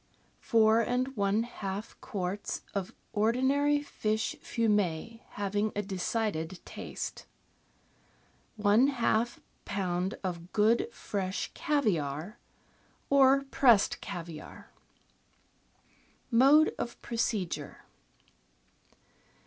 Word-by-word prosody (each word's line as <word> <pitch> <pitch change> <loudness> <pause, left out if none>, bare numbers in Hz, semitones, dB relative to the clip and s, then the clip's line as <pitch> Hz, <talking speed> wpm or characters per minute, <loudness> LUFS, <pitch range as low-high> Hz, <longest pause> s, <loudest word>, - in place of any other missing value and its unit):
— - - -37
Four 220 -1 +4
and 250 +3 0
one 200 +2 +1
half 210 -3 -6
quarts 195 0 -4
of 195 -2 -3 0.2
ordinary 270 +7 +2
fish 220 -5 -2
fumet 210 -1 0
having 205 +1 -1
a 205 - -1
decided 190 -3 -2
taste; - - -6 1.3
one 210 +4 +4
half 240 -3 +1 0.3
lb. 185 -1 -1
of 175 -1 -5
good 225 - +3
fresh 190 -2 -3
caviare, 190 - -1 0.7
or 275 0 +6
pressed 235 -7 +4
caviare. 170 -6 -8 1.6
Mode 275 +6 +6
of 235 - -4
Procedure. 225 -6 -2
215 Hz, 85 wpm, -30 LUFS, 190-240 Hz, 1.6 s, or